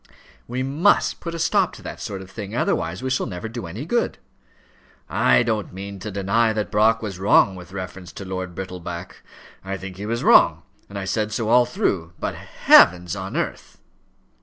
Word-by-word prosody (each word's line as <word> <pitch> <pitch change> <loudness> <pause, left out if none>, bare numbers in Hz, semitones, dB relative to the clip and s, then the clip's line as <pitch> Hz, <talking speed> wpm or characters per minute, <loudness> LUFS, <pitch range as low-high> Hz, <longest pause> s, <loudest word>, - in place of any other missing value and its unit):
"We 125 +2 -2
must 150 +9 +2
put 170 -1 -5
a - - -4
stop 185 +2 +2
to - - -12
that - - -7
sort 100 -3 -5
of 95 - -15
thing, 105 0 -7
otherwise 90 -2 -1
we 130 - -2
shall 130 - 0
never 90 +4 -5
do 115 -4 -6
any 105 - -6
good." 240 +8 0 0.9
"I - - +3
don't 110 -3 -2
mean 100 +1 -7
to 105 - -6
deny 105 +3 +1
that 105 -1 -3
Brock 110 +2 +3
was 95 -4 -5
wrong 95 0 +4
with 90 -1 -11
reference 95 -1 -7
to 95 - -8
Lord 95 -2 -5
Brittleback. 90 -1 -7 0.4
I 95 0 -4
think 95 -1 -9
that - - -13
he - - -4
was 115 +1 -2
wrong, - - +5 0.3
and 100 - -7
I 95 - -4
said 105 +2 -1
so 110 0 -2
all 120 +1 +5
through. 85 -8 -1
But, - - -2
heavens 90 -1 +4
on - - -5
earth - - -4
100 Hz, 195 wpm, -22 LUFS, 95-115 Hz, 0.9 s, wrong